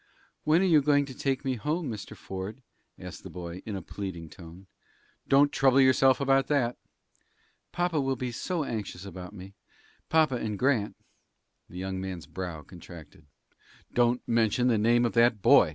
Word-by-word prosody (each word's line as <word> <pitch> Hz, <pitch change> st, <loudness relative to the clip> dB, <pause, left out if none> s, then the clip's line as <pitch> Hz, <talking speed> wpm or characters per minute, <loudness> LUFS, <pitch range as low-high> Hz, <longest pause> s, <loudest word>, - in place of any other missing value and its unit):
"When 160 Hz, +4 st, +4 dB
are -, -, +3 dB
you 160 Hz, -5 st, +5 dB
going 145 Hz, 0 st, +3 dB
to 135 Hz, -, -9 dB
take 135 Hz, +1 st, -2 dB
me 130 Hz, -2 st, -1 dB
home, 155 Hz, +8 st, -2 dB
Mr. 110 Hz, -5 st, -7 dB
Ford?" 95 Hz, +7 st, -7 dB, 0.3 s
asked -, -, -9 dB
the -, -, -10 dB
boy, 90 Hz, 0 st, -7 dB
in 105 Hz, -, -3 dB
a 95 Hz, -, -6 dB
pleading 85 Hz, -5 st, -7 dB
tone. 85 Hz, +2 st, -13 dB, 0.6 s
"Don't 140 Hz, +1 st, +5 dB
trouble 135 Hz, -1 st, +4 dB
yourself 130 Hz, 0 st, +5 dB
about 135 Hz, -1 st, +2 dB
that." 125 Hz, -5 st, +1 dB, 0.9 s
"Papa 175 Hz, -4 st, 0 dB
will 135 Hz, 0 st, 0 dB
be 125 Hz, 0 st, -4 dB
so 165 Hz, +7 st, -2 dB
anxious 105 Hz, -7 st, -5 dB
about 90 Hz, -2 st, -8 dB
me 95 Hz, -1 st, -11 dB, 0.6 s
papa 155 Hz, -5 st, +3 dB
and 110 Hz, -3 st, -3 dB
Grant!" 125 Hz, -5 st, +1 dB, 0.7 s
The 90 Hz, -, -10 dB
young 95 Hz, 0 st, -4 dB
man's 95 Hz, -4 st, -6 dB
brow 90 Hz, -5 st, -6 dB
contracted. 85 Hz, -3 st, -13 dB, 0.7 s
"Don't 120 Hz, 0 st, +1 dB
mention 115 Hz, +2 st, +2 dB
the 115 Hz, -3 st, +2 dB
name 120 Hz, +3 st, +3 dB
of 115 Hz, -, -1 dB
that 115 Hz, -1 st, +4 dB
boy! -, -, +6 dB
120 Hz, 170 wpm, -28 LUFS, 95-135 Hz, 0.9 s, boy